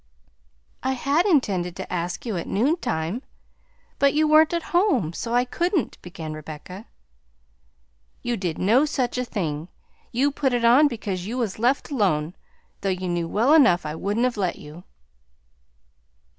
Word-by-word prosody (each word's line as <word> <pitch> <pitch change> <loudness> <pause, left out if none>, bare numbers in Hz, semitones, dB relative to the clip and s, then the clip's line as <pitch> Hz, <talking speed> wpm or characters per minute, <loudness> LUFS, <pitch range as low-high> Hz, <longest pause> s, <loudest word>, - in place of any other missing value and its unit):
"I 265 +1 0
had 285 +8 +1
intended 190 - +1
to 190 - -6
ask 175 +4 -3
you 225 -4 -2
at 170 - -4
noontime, 215 - -1 0.8
but 280 0 +3
you 310 0 +3
weren't 310 +1 +6
at 340 -1 -1
home, 310 - +2
so 230 +6 -3
I 245 +1 +3
couldn't," 340 - -1
began 165 -3 -7
Rebecca. 155 +6 -9 1.4
"You 240 0 -1
did 180 -6 -3
no 235 +10 +4
such 255 -4 -1
a - - 0
thing; 165 -9 -3 0.4
you 275 +5 +2
put 270 -2 0
it 240 -1 +1
on 255 +6 +6
because 200 -8 -4
you 240 +4 -4
was 220 -5 -2
left 255 +6 +1
alone, 180 - +1 0.5
though 195 - -1
you 185 0 -2
knew 175 -1 -1
well 235 - +3
enough 250 - +5
I 150 - -3
wouldn't 205 +8 -1
have 250 -3 0
let 185 -3 0
you." 155 +5 -12
225 Hz, 155 wpm, -24 LUFS, 175-270 Hz, 1.4 s, weren't